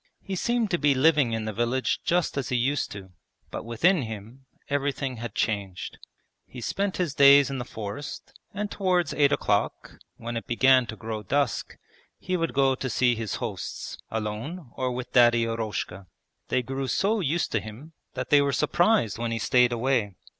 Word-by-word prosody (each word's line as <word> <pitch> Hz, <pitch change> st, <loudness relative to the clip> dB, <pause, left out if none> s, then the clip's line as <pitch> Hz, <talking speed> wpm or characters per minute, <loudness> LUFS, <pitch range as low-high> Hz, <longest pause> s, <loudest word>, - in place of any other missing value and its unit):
He 195 Hz, -, -4 dB
seemed 235 Hz, +2 st, 0 dB
to 175 Hz, -, +1 dB
be 145 Hz, -2 st, +3 dB
living 140 Hz, -3 st, +3 dB
in 110 Hz, -1 st, -2 dB
the 110 Hz, -, -3 dB
village 120 Hz, +4 st, 0 dB
just 175 Hz, -1 st, +1 dB
as 140 Hz, -2 st, -2 dB
he 125 Hz, -, 0 dB
used 135 Hz, +4 st, 0 dB
to, 95 Hz, -2 st, -9 dB, 0.4 s
but -, -, -5 dB
within 150 Hz, -, +2 dB
him 115 Hz, +3 st, -8 dB, 0.2 s
everything 140 Hz, -2 st, -1 dB
had 115 Hz, -2 st, -6 dB
changed. 100 Hz, -4 st, -2 dB, 0.5 s
He 125 Hz, -, -10 dB
spent 195 Hz, -, -2 dB
his 175 Hz, -6 st, -1 dB
days 140 Hz, 0 st, +7 dB
in 135 Hz, -, -3 dB
the 120 Hz, -, -4 dB
forest, 110 Hz, +5 st, -7 dB, 0.2 s
and 205 Hz, +1 st, -4 dB
towards 180 Hz, -5 st, +1 dB
eight 145 Hz, -1 st, +3 dB
o'clock, 105 Hz, -7 st, -1 dB, 0.2 s
when 120 Hz, 0 st, -5 dB
it 115 Hz, -, -6 dB
began 130 Hz, +1 st, +4 dB
to 110 Hz, -, -6 dB
grow 110 Hz, -1 st, -5 dB
dusk, 140 Hz, +4 st, -1 dB, 0.4 s
he 185 Hz, -, -3 dB
would 165 Hz, -4 st, -1 dB
go 135 Hz, -1 st, +4 dB
to 130 Hz, 0 st, -4 dB
see 125 Hz, +1 st, +3 dB
his 115 Hz, -3 st, -3 dB
hosts, -, -, -5 dB
alone 115 Hz, +8 st, -5 dB
or 130 Hz, -1 st, -1 dB
with 125 Hz, 0 st, -6 dB
Daddy 120 Hz, -1 st, +5 dB
Eroshka. 105 Hz, -4 st, -4 dB, 0.4 s
They 125 Hz, -, 0 dB
grew 135 Hz, +2 st, -3 dB
so 210 Hz, -, +1 dB
used 170 Hz, -1 st, 0 dB
to 110 Hz, -, +1 dB
him 115 Hz, +10 st, -10 dB, 0.2 s
that -, -, -4 dB
they 145 Hz, -1 st, +7 dB
were 140 Hz, -1 st, +1 dB
surprised 150 Hz, -, +2 dB
when 120 Hz, 0 st, -1 dB
he 115 Hz, -, -1 dB
stayed 125 Hz, +2 st, +3 dB
away. 120 Hz, -4 st, 0 dB
130 Hz, 180 wpm, -26 LUFS, 115-145 Hz, 0.5 s, days